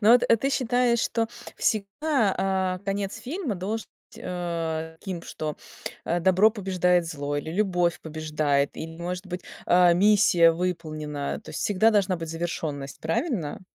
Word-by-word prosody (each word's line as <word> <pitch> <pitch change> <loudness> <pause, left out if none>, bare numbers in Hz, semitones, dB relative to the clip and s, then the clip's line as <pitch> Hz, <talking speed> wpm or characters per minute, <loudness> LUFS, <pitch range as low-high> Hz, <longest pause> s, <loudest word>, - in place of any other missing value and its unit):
Но 220 +2 +6
вот, 245 - +6
а 230 - +6
ты 270 +5 -1
считаешь, 245 -2 +2
что 225 0 0 0.3
всегда, 220 +2 +1
а, 190 -1 0
конец 200 +2 -2
фильма 275 - -3
должен 205 +5 -3 0.3
быть, - - -12
э, 165 -2 -3
таким, 180 -4 -5
что, 155 -2 -5 0.5
а, 175 +1 0
добро 190 +5 +5
побеждает 180 -4 +1
зло 145 -2 -3
или 145 +2 -4
любовь 180 -2 +1
побеждает, 150 -3 0
или 160 0 -6
может 180 +2 -5
быть, 180 0 -5 0.2
э, 175 -1 +6
миссия 180 -3 +5
выполнена. 155 -4 -3
То - - -10
есть - - -5
всегда 210 +2 +3
должна 200 -3 +2
быть 165 -1 -6
завершенность. 155 -4 -4
Правильно? 165 - -2
180 Hz, 155 wpm, -26 LUFS, 160-210 Hz, 0.5 s, Но